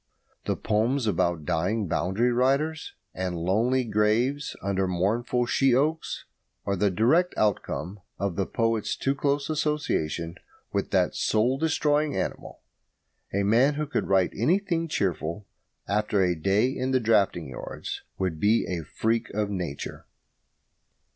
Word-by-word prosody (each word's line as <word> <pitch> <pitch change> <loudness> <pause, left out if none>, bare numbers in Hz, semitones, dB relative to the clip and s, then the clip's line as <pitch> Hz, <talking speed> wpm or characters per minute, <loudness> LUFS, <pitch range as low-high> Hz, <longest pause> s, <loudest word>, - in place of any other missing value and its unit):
The - - 0
poems 115 +5 0
about 85 -6 0
dying 100 +8 0
boundary 95 +10 +1
riders, 140 +6 0 0.2
and 90 -1 -3
lonely 110 +10 +1
graves 115 +6 +1
under 95 -1 0
mournful 110 +7 0
she 135 +1 +3
oaks, 155 +5 -1 0.4
are 100 - 0
the 100 +2 +2
direct 130 - +2
outcome 105 -2 -1 0.2
of 100 -3 -2
the 95 - -1
poet's 115 -2 0
too 135 - +1
close 140 0 0
association 145 - -1 0.4
with - - -1
that - - +2
soul 120 +5 +1
destroying 150 -1 +1
animal. - - -4 0.7
A 100 +1 0
man 120 +8 +4
who 150 +1 -1
could 145 - -2
write 95 -2 +2
anything 170 - +1
cheerful 95 - -2 0.4
after 105 0 +1
a 90 -1 +2
day 100 +9 +2
in 130 -1 -2
the 130 -1 +3
drafting 100 - +2
yards 65 - -6 0.2
would 90 -5 -2
be 105 +6 +3
a 85 -3 -3
freak 110 - -1
of 105 -1 0
nature. 90 -7 -5
110 Hz, 135 wpm, -26 LUFS, 95-135 Hz, 0.7 s, man